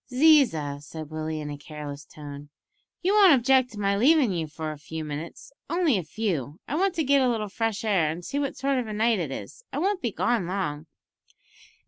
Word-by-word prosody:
"Ziza," 250 - +4
said 155 0 -9
Willie 155 0 -3
in 150 -1 -5
a 145 - -7
careless 145 -1 -8
tone, 145 0 -10 0.5
"you 380 +3 +2
won't 400 -5 +7
object 260 0 +3
to 210 - -8
my 200 -1 +1
leavin' 265 +2 +4
you 165 -3 -2
for 155 +1 -5
a 150 - -9
few 160 +1 -6
minutes; 150 - -7 0.2
only 335 -5 +2
a - - -4
few; 160 - -3
I - - -4
want 375 +2 +1
to 320 - +1
get 280 0 +4
a 255 - +3
little 215 -3 -1
fresh 225 +1 -2
air, 190 -7 +3
an' 165 +3 -5
see 280 - -3
what 280 -2 -2
sort 275 0 +1
of 245 - -3
a 215 - -5
night 220 0 +2
it 165 -5 -2
is; 305 - -8
I - - -4
won't 380 +5 0
be 235 - -1
long 235 -7 +1
gone." 160 -5 -3
200 Hz, 215 wpm, -26 LUFS, -, 0.5 s, won't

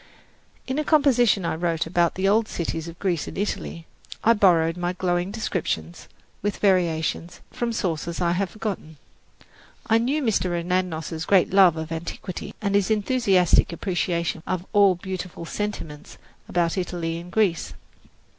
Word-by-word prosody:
In 265 +3 -2
a - - +1
composition 255 - +3
which 170 - 0
I - - -2
wrote 165 -1 0
about 170 0 +1
the 190 +1 0
old 215 +2 +3
cities 165 -1 -3
of 170 0 -9
Greece 175 -4 -1
and - - -7
Italy, 185 -4 -3 0.4
I 230 - +6
borrowed 170 -6 +4
my 175 0 -2
glowing 175 0 -1
descriptions, 175 - -3 0.3
with 205 0 -2
variations, 175 -3 0
from 240 -1 -2
sources 170 -5 -2
I 175 -1 +2
have 185 +2 0
forgotten. 190 -7 -5 0.9
I 225 0 +3
knew 275 +6 0
Mr. 185 -7 +1
Anagnos's 170 -2 -2
great 190 -1 +3
love 185 -4 +6
of 160 0 -5
antiquity 170 +2 -6
and 200 -1 0
his 200 0 +2
enthusiastic 205 -6 +3
appreciation 170 -2 -1
of 185 -1 -2
all 200 -2 +5
beautiful 180 -2 -6
sentiments 165 -6 -5 0.3
about 175 +1 +1
Italy 170 -2 -3
and 175 +1 -11
Greece. 190 -5 0
180 Hz, 150 wpm, -24 LUFS, 170-205 Hz, 0.9 s, I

